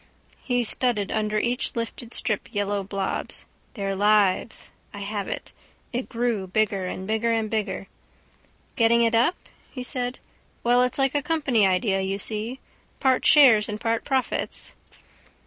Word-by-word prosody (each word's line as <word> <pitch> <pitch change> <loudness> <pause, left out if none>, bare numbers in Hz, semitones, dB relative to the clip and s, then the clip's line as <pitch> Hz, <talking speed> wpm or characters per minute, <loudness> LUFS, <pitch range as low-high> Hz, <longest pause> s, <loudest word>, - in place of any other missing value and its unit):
He 245 -2 0
studded 225 -3 +1
under 215 -1 0
each 245 +5 -1
lifted 230 0 -5
strip 215 -4 -1
yellow 205 0 -1
blobs. 195 0 -3 0.3
Their 195 -3 -2
lives. 205 +1 +2 0.2
I 205 - -7
have 200 0 -4
it. - - -6 0.4
It 245 +2 -3
grew 230 -5 -1
bigger 200 -1 0
and 185 +1 -5
bigger 220 +3 0
and 225 -2 -1
bigger. 205 -3 -2 0.9
—Getting 235 0 +4
it 230 0 +2
up? 235 +10 +3 0.3
he 255 - -7
said. 250 -1 -2 0.5
Well, 245 +1 +4
it's 250 0 +1
like 270 -1 +1
a 290 - +1
company 280 -9 +2
idea, 190 +1 +1
you 190 +1 -2
see. 220 +5 -1 0.4
Part 260 -1 +2
shares 235 -8 +7
and 210 0 -4
part 225 0 -1
profits. 265 -2 -2
225 Hz, 145 wpm, -25 LUFS, 205-245 Hz, 0.9 s, shares